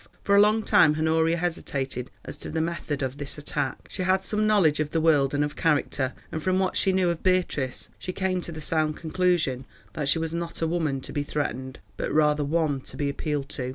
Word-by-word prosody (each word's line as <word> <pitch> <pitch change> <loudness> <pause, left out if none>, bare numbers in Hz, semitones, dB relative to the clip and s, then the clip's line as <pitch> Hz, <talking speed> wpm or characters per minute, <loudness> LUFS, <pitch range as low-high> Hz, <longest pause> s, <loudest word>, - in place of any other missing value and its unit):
For 200 - +3
a - - +7
long 215 +1 +4
time 155 -7 +5
Honoria 160 +1 +2
hesitated 135 -7 -3 0.2
as - - -6
to - - -7
the 160 - -2
method 160 -3 -2
of 130 +2 -3
this 145 0 -6
attack. 145 -2 -3
She 190 - -4
had 185 +1 +2
some 215 +2 0
knowledge 185 -9 +4
of 155 -1 0
the 165 - 0
world 150 -4 +3
and 145 - +2
of 145 0 -3
character, 145 -4 +1 0.2
and 160 - -3
from 185 +3 +1
what 190 -1 0
she 195 - +3
knew 185 -2 +2
of 170 - -5
Beatrice 180 -8 0
she 185 - -4
came 185 -1 -1
to 170 - -7
the 160 -1 -7
sound 155 -1 0
conclusion 165 -6 0 0.3
that 150 -3 -1
she 165 - +4
was 165 0 -2
not 170 0 -4
a 165 - +1
woman 160 -5 -1
to - - -8
be 145 - 0
threatened, 130 -3 -3 0.2
but - - -2
rather 150 0 +3
one 145 -2 0
to - - -9
be 145 -1 0
appealed 145 -1 -2
to. 125 -2 -4
160 Hz, 225 wpm, -26 LUFS, 145-175 Hz, 0.3 s, a